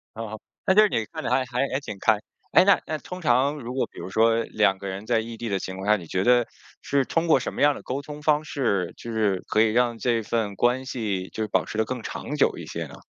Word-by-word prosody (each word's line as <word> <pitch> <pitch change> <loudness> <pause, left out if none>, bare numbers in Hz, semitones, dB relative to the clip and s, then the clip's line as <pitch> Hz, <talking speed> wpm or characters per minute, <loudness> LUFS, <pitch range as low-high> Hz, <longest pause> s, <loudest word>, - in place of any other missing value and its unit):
哦， 110 -1 -6 0.3
那 190 - +4
就 210 - +7
是 215 - +4
你 115 - -1
看 - - -8
得 - - -1
还 125 +2 +3
还 125 +2 -1
还 130 - 0
挺 125 -8 -7
开。 110 -2 +3 0.3
诶 - - +8
那 200 +1 +5
那 155 - -2
通 180 0 -8
常 135 +1 +3
如 125 0 -6
果 130 - 0
比 - - -12
如 - - -6
说 115 +2 +3
两 100 -3 +2
个 100 - -7
人 95 +2 -5
在 115 0 +2
异 115 0 -6
地 115 -1 -4
的 95 -1 0
情 95 - -6
况 95 +2 -6
下， 105 - +6
你 85 -4 -10
觉 90 +3 -1
得 120 +1 +4 0.3
是 140 -1 +1
通 165 +5 0
过 155 - +5
什 125 - -4
么 - - -4
样 145 +1 +6
儿 - - -10
的 - - -9
沟 135 +2 -3
通 150 +1 -9
方 150 0 +2
式， 100 - -1
就 115 - -7
是 105 -4 0
可 110 - +3
以 110 -1 +4
让 120 0 +2
这 115 +1 +1
份 105 -2 -1
关 125 +5 +1
系 105 -8 -3
就 110 - -3
是 - - -3
保 - - +1
持 110 - -6
得 110 - +2
更 125 +1 -4
长 145 - -5
久 145 - +2
一 - - -7
些 - - -5
呢？ - - -12
115 Hz, 305 characters per minute, -25 LUFS, 105-135 Hz, 0.3 s, 诶